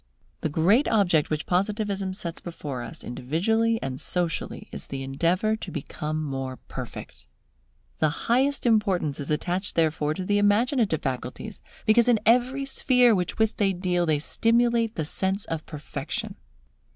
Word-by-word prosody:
The 155 - 0
great 185 - +3
object 180 -9 +3
which 155 -1 -2
Positivism 200 0 -1
sets 170 -3 -4
before 145 -7 -6
us - - -8
individually 220 - 0
and 130 -1 -4
socially, 175 -3 -2
is - - -7
the 135 -1 -5
endeavour 170 +10 +1
to 205 - -7
become 155 0 -4
more 135 -3 -4
perfect. - - -9 0.7
The 155 - +3 0.2
highest 265 +4 +2
importance 195 - +2
is 140 - -4
attached 175 +6 -1
therefore 155 -2 +1
to 185 - -4
the 205 +1 +2
imaginative 205 - +2
faculties, 130 - -5 0.2
because 235 +2 +5
in 240 -3 +4
every 250 +4 +3
sphere 250 -3 +4
with 180 -4 -1
which 220 0 +2
they 195 -2 +2
deal 180 -1 0
they 155 -1 +3
stimulate 230 +7 +2
the 160 - -2
sense 190 +5 -1
of 165 -1 -5
perfection. 155 - -5
185 Hz, 150 wpm, -26 LUFS, 155-220 Hz, 0.7 s, because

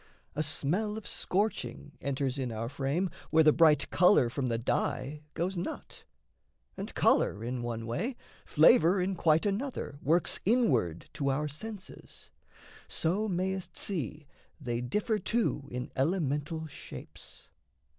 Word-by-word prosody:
A 150 - 0
smell 180 +8 0
of 220 - -8
scorching 200 -6 -1
enters 135 -1 -1
in 125 -3 -2
our 115 +1 -3
frame 145 +7 -1 0.2
Where 160 0 +5
the 155 -1 +6
bright 155 -2 +4
colour 180 -10 +5
from 130 +1 -1
the 115 -1 0
dye 130 +4 -1
goes 180 +4 -1
not; 175 - -6 0.7
And - - -5
colour 105 - +3
in 125 +1 -3
one 115 -1 -4
way, 220 - -2 0.3
flavour 165 +4 +5
in 185 +2 0
quite 160 0 +3
another 205 - -2
Works 165 +4 +2
inward 130 - +2
to 140 -2 -1
our 145 +3 0
senses 190 +7 -9 0.6
so 190 +7 0
mayst 185 -1 -2
see 155 - -2 0.3
They 120 -4 -2
differ 210 - 0
too 210 -13 -1
in 125 +1 -5
elemental 155 +1 0
shapes. 145 - -11
155 Hz, 135 wpm, -30 LUFS, 135-190 Hz, 0.7 s, the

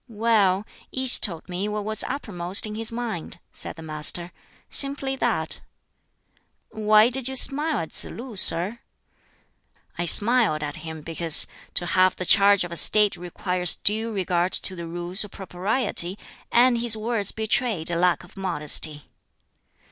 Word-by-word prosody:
"Well, 210 -3 0 0.3
each 260 -1 -1
told 170 -5 -3
me 185 +3 -5
what 210 -1 -5
was 215 0 +1
uppermost 200 -9 -1
in 210 - -7
his 225 +1 -1
mind," 230 -8 -7
said - - -6
the 165 - -12
Master; 160 +3 -4 0.4
"simply 275 -1 +1
that." - - -3 1.1
"Why 215 +1 +3
did 260 0 -2
you 265 - -5
smile 295 +4 +1
at 160 - -6
Tsz - - +3
lu, 240 -1 -10
sir?" 190 +4 +5 1.2
"I 175 - -2
smiled 210 -6 +5
at 145 +3 -6
him 160 0 -9
because 165 0 +4 0.3
to 175 - +1
have 185 +1 +1
the 185 - -5
charge 200 +1 +4
of 175 - -8
a 170 - -4
State 210 +1 +4
requires 180 0 -1
due 220 +2 -1
regard 180 -3 -2
to 190 - -2
the 170 -1 -8
Rules 175 +4 0
of 210 - -10
Propriety, 190 0 -1 0.3
and 240 0 +3
his 230 -2 +2
words 215 -2 -2
betrayed 220 -5 -2
a - - -2
lack 175 +1 0
of 175 - -19
modesty." 155 -5 0
200 Hz, 155 wpm, -22 LUFS, 175-225 Hz, 1.2 s, sir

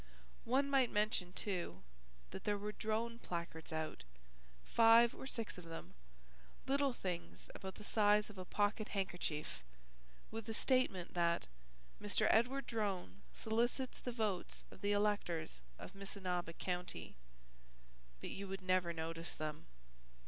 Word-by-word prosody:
One 270 +4 +3
might 270 -3 +4
mention, 210 -4 +1
too, 180 - -3 0.5
that - - -6
there 205 -1 +2
were 210 +1 -3
Drone 225 +2 -1
placards 170 -3 -4
out, 160 - -2 0.6
five 230 +1 +7
or 265 - -7
six 230 -7 -4
of 175 - -10
them, 165 0 -7 0.7
little 275 0 +3
things 180 -7 -4
about 190 0 -6
the 210 - -9
size 210 0 +4
of 205 -3 -10
a - - -3
pocket 205 +3 +1
handkerchief, 175 - -2 0.7
with 225 0 -5
a 220 - -1
statement 235 -10 +2
that 170 -1 +2 0.6
"Mr. 210 +1 +2
Edward 250 +4 +3
Drone 190 - -2
solicits 240 +4 0
the 250 - -3
votes 215 -6 -1
of - - -13
the 205 - +2
electors 205 - +1 0.2
of - - -8
Missinaba 185 -3 -3
County." 180 - -3 1.1
But - - -4
you 200 +1 -4
would 195 0 -5
never 185 -2 +3
notice 165 +1 -4
them. 155 -1 -4
200 Hz, 135 wpm, -39 LUFS, 175-225 Hz, 1.1 s, five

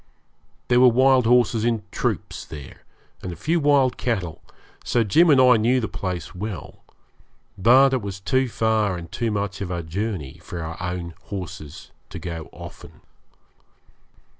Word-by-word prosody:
There 125 0 +4
were 130 - +7
wild 130 0 +4
horses 120 -2 +3
in 115 -2 0
troops - - -3
there, 75 -4 -10 0.4
and 95 - -5
a - - -6
few 165 - 0
wild 140 -4 +3
cattle, 95 -10 -2 0.4
so 120 - +1
Jim 160 - +4
and 140 -3 +6
I 125 -2 +6
knew 120 +4 +2
the 110 - -2
place 90 -2 -5
well; 100 0 -7 0.7
but 130 +7 +5
it 130 - +1
was 100 -1 -6
too 130 +5 +1
far 110 -4 +1
and 85 -1 -9
too 115 - -1
much 100 -1 -3
of 95 - -3
a 85 -2 -3
journey 85 -4 -4
for 85 -2 -6
our 80 +1 -5
own 90 -1 -4
horses 85 -6 -8 0.2
to - - -7
go 85 -3 -6
often. - - -12
105 Hz, 160 wpm, -23 LUFS, 90-125 Hz, 0.7 s, were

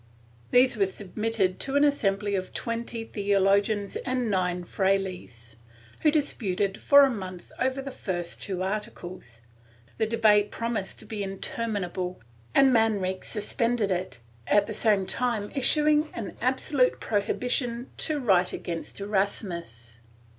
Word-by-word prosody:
These 250 -1 +4
were 195 -2 +3
submitted 200 0 -2
to 275 - -3
an 285 - +5
assembly 205 -8 +1
of 185 -1 -3
twenty 230 0 -3
theologians 200 0 +1
and 250 -3 -1
nine 180 -2 0
frailes, 180 - -2 0.4
who 310 - +4
disputed 205 - 0
for 285 0 +6
a 275 - +5
month 185 -5 -7
over 260 +1 0
the 275 - -6
first 175 -8 -4
two 185 -2 -3
articles; 185 - -5 0.6
the 220 - +2
debate 215 -2 +4
promised 230 -4 -3
to - - -13
be 210 -1 -5
interminable, 195 -2 -3 0.4
and 270 -1 +6
Manrique 205 -5 +1
suspended 225 0 -1
it, 180 -9 -2 0.3
at 205 -1 +4
the 215 - -5
same 210 -3 +2
time 225 -2 -1
issuing 300 +3 +3
an 205 -5 -5
absolute 260 +1 +2
prohibition 240 +3 -1
to 305 -2 -1
write 190 -8 +3
against 170 +2 -5
Erasmus. 175 - -3
205 Hz, 130 wpm, -27 LUFS, 185-235 Hz, 0.6 s, for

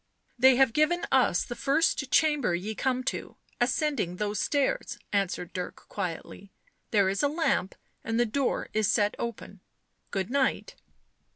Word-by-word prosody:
" - - -41
They 265 -1 +8
have 260 -2 +4
given 320 +4 +2
us 255 -9 +3
the 240 - -6
first 280 0 +1
chamber 295 - +3
ye 200 +5 -4
come 255 +3 -1
to, - - -4 0.2
ascending 250 - 0
those 210 +2 -2
stairs," 300 - 0 0.2
answered 195 -3 -1
Dirk 180 -1 -4
quietly. 190 +1 -5 0.2
" - - -46
There 200 -3 +3
is 195 +1 0
a 290 - +3
lamp, 285 - 0 0.3
and 225 +1 -1
the 240 - +4
door 260 +4 -1
is 215 -1 +2
set 205 0 +2
open. 225 -4 -6 0.5
Good 195 +2 -3
night." 280 - 0
240 Hz, 160 wpm, -28 LUFS, 200-280 Hz, 0.5 s, They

